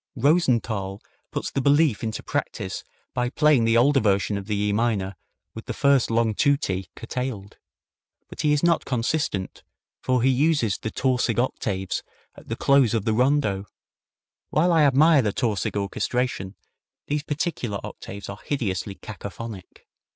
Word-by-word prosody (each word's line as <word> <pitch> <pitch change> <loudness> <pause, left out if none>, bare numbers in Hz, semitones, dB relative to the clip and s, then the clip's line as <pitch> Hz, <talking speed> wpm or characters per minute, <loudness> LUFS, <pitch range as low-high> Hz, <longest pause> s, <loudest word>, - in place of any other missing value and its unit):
Rosenthal 120 - +1 0.3
puts - - -3
this 135 - -1
belief 145 -4 +3
into 110 -1 -3
practice - - -3 0.3
by 125 0 0
playing 145 -3 +3
the 115 0 +4
older 135 +4 +5
version 100 -2 +1
of 100 0 -5
the 105 - -1
E 105 0 +1
minor 105 -4 0 0.4
with - - -9
the - - -4
first 140 -3 +3
long 115 -1 +2
tutti 100 - 0
curtailed. 115 -4 -5 0.7
But - - -7
he 150 - +2
is 150 +1 +2
not 170 -1 +3
consistent, 115 -5 -2 0.4
for 130 -2 +1
he 130 - +4
uses 135 -6 +2
the 110 - -3
Tausig 125 -2 0
octaves 100 -6 -1 0.3
at - - -16
the - - -3
close 135 -5 +3
of 110 - -1
the 110 - +2
rondo. 115 -5 +1 0.8
While 170 +3 +3
I 160 -2 +5
admire 145 +2 +5
the 105 -4 0
Tausig 105 -3 -1
orchestration, 100 0 -2 0.5
these 150 0 -1
particlar 145 - -2
octaves 100 +1 -8
are 100 0 -7
hideously 100 -8 -2
cacaphonic. 105 -1 -9
120 Hz, 150 wpm, -24 LUFS, 100-140 Hz, 0.8 s, older